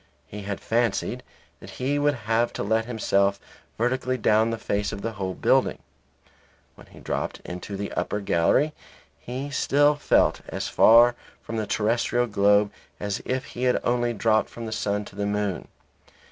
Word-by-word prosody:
He 105 - -8
had 100 0 -4
fancied 115 -2 -1 0.4
that - - -12
he 140 +3 0
would 145 0 +2
have 115 +2 +1
to - - -3
let 110 +2 +1
himself 100 -4 +1 0.4
vertically 130 +2 0
down 110 0 +3
the 115 - -2
face 100 -2 -2
of 100 - -7
the 115 - -2
whole 95 -3 -4
building. - - +2 1.0
When - - -17
he - - -15
dropped - - -3
into 90 +3 -6
the 100 0 -4
upper 105 - -2
gallery 100 - +2 0.5
he 130 +4 -6
still 145 +1 +3
felt 145 - +2
as - - -4
far 120 +2 +6 0.3
from 115 - -5
the 110 -2 -2
terrestrial 115 +3 +1
globe 100 -1 +3 0.3
as 100 -1 -3
if 130 0 -2
he 125 +1 -4
had 125 - +3
only 120 0 +1
dropped 110 0 +1
from 115 - -8
the 110 - -5
sun 105 -1 -1
to - - -13
the 100 0 -2
moon. 105 -2 -2
110 Hz, 170 wpm, -25 LUFS, 100-120 Hz, 1.0 s, far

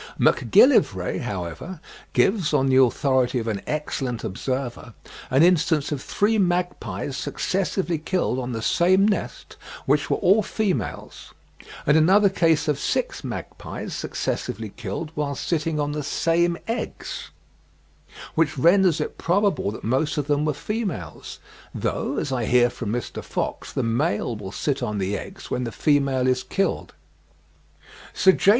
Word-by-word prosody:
Macgillivray, - - +4
however, 95 - -5 0.3
gives, 190 -7 +2
on 135 -2 +3
the 130 -1 +3
authority 130 0 +2
of 115 -1 -2
an 105 -3 -2
excellent 135 -5 -3
observer, 125 +2 -4 0.3
an 135 +4 +4
instance 160 -4 +3
of 145 -3 -2
three 215 +2 +1
magpies 175 - -1
successively 180 +3 -1
killed 160 -5 -1
on 125 0 -4
the 115 -1 -4
same 185 - +4
nest, 210 - -3 0.3
which - - +2
were - - +2
all 200 +4 +4
females; 185 - -3 0.5
and 150 - +4
another 195 +6 +5
case 165 -5 +2
of 150 -2 +1
six - - -1
magpies - - -6
successively 110 +1 -3
killed 120 - -5
whilst 140 -2 -3
sitting 160 -2 0
on 145 0 0
the 150 0 -3
same 170 +3 +1
eggs, 230 +2 -4 1.0
which 155 -2 +1
renders 175 +3 +4
it 150 - -4
probable 195 - +1
that 105 - -7
most 135 +8 0
of 145 - 0
them 145 0 +1
were 150 - +1
females; 170 - -4 0.4
though, - - -2
as 140 - -2
I 125 -3 -1
hear 120 0 +4
from 110 -4 -4
Mr. 120 +1 -4
Fox, - - -4
the - - -1
male 115 -1 0
will 100 -3 -7
sit 140 +5 -2
on 105 -1 -2
the 100 +1 -1
eggs - - -8
when 125 - -1
the 115 - -3
female 140 -1 +2
is 130 0 +2
killed. 195 +8 -2 1.2
Sir 190 - +6
J. 190 - +2
145 Hz, 145 wpm, -24 LUFS, 120-175 Hz, 1.2 s, Sir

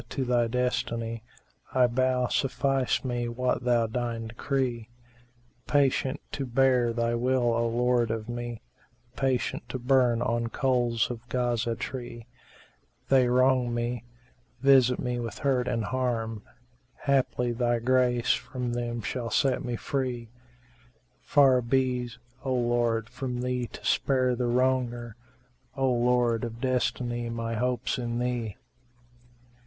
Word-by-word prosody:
to 135 - -2
Thy 120 -1 +2
destiny 115 -2 -1 0.3
* - - -28
I 130 -1 +6
bow, 125 +1 +1
suffice 135 +1 0
me 120 -1 -1
what 125 +1 -1
Thou 120 -2 +3
deign 115 0 -3
decree: 120 -1 -2 0.8
Patient 135 -2 +2
to 135 -2 -3
bear 125 -1 +3
Thy 115 0 0
will, 120 0 +1
O 115 0 +1
Lord 120 0 +1
of 110 0 -3
me, 120 -1 -5 0.2
* 120 0 -37
Patient 130 -2 0
to 130 - -3
burn 125 -2 +3
on 115 0 0
coals 120 -2 +1
of 120 0 -9
Ghazá 120 -2 0
tree: 120 -3 -6 0.8
They 130 -2 +5
wrong 125 -1 +3
me, 120 -1 -2 0.6
visit 130 -2 +5
me 125 -1 -2
with 115 -1 -5
hurt 130 -3 +1
and 115 -3 -1
harm; 115 -2 -2 0.3
* 120 0 -26
Haply 130 -3 +1
Thy 120 0 +1
grace 125 0 +2
from 125 -2 -4
them 120 -1 -3
shall 115 +6 -3
set 130 +6 +1
me 120 -2 -2
free: 125 -2 -3 0.9
Far 135 -3 +4
be's, 125 -1 0 0.3
O 130 -1 0
Lord, 120 -2 +1
from 125 -1 -4
thee 125 -1 -1
to - - -11
spare 130 -2 +2
the 120 0 -1
wronger 120 -2 0 0.3
* 125 +2 -34
O 135 -1 +2
Lord 120 -1 +2
of 115 -1 -5
Destiny 120 -2 -1
my 115 0 -3
hope's 125 +2 -1
in 120 -1 -2
Thee!" 120 -4 -2
120 Hz, 140 wpm, -27 LUFS, 120-130 Hz, 0.9 s, I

